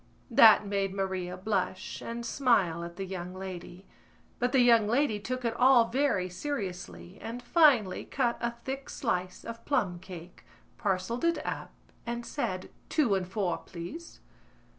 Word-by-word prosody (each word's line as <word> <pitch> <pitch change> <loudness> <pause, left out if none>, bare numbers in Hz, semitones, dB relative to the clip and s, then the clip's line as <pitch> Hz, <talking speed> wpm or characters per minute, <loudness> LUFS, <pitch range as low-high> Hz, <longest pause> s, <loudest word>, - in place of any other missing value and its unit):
That 220 -2 +8
made 195 -1 -1
Maria 185 -2 -2
blush 190 -1 -2
and 235 0 -5
smile 200 -11 +2
at 170 0 -7
the 195 - -4
young 180 -1 -6
lady; 185 0 -8 0.5
but 245 0 +1
the 265 - +5
young 230 -3 +5
lady 240 -1 +2
took 255 +5 -4
it 230 0 0
all 245 -2 +5
very 250 -7 +1
seriously 185 -4 -5
and 230 +2 -5
finally 245 - +4
cut 245 -3 0
a 235 0 -1
thick 270 +1 -4
slice 185 -7 -2
of 230 0 -7
plumcake, 180 - -3 0.4
parcelled 205 - -1
it 335 0 +1
up - - -4 0.3
and 235 0 -4
said: 185 -10 -3 0.2
"Two 275 -10 +2
and 190 -2 0
four, 190 -2 -1
please." 235 - -9
210 Hz, 145 wpm, -29 LUFS, 185-245 Hz, 0.5 s, That